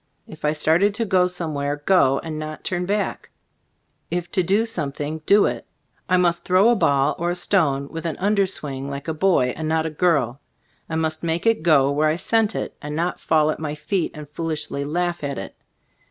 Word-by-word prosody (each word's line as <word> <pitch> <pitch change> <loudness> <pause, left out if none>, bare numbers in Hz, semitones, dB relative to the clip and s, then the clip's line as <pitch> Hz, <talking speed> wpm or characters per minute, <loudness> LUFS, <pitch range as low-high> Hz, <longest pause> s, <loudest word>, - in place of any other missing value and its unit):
If 155 - -13
I 150 - +2
started 165 +7 +2
to 230 - -1
go 185 -2 +3
some 175 -3 -4
where, 145 0 -1
go, 145 -3 +3
and 155 -1 -5
not 155 0 -6
turn 180 -1 -2
back; 205 0 -2 0.8
if 175 0 -3
to 185 - +2
do 200 +6 +2
something, 155 -6 -3
do 205 +1 +6
it. - - -3 0.4
I 185 - +4
must 175 -1 +2
throw 185 +5 +4
a 240 - +4
ball 140 -6 +2
or 170 +1 0
a 175 - -1
stone 155 -7 +1
with 165 +2 -5
an 160 - -4
under 200 0 +2
swing 140 -6 -5
like 140 +1 -6
a 160 - -1
boy 155 -7 +2
and 155 0 -3
not 160 0 +1
a 160 - -2
girl, 145 -6 +1 0.5
and 160 0 -1
must 155 0 -2
make 170 +2 -2
it 225 -6 +3
go 145 -4 +4
where 150 +2 +2
I 155 - +1
sent 220 +4 +1
it, - - -4
and 150 0 -5
not 170 +3 -1
fall 155 -1 +2
at - - -5
my 150 -1 -4
feet 165 +4 -1
and 150 -1 -8
foolishly 150 -2 -4
laugh 175 +3 -2
at 140 -1 -3
it. - - -7
160 Hz, 210 wpm, -22 LUFS, 150-180 Hz, 0.8 s, do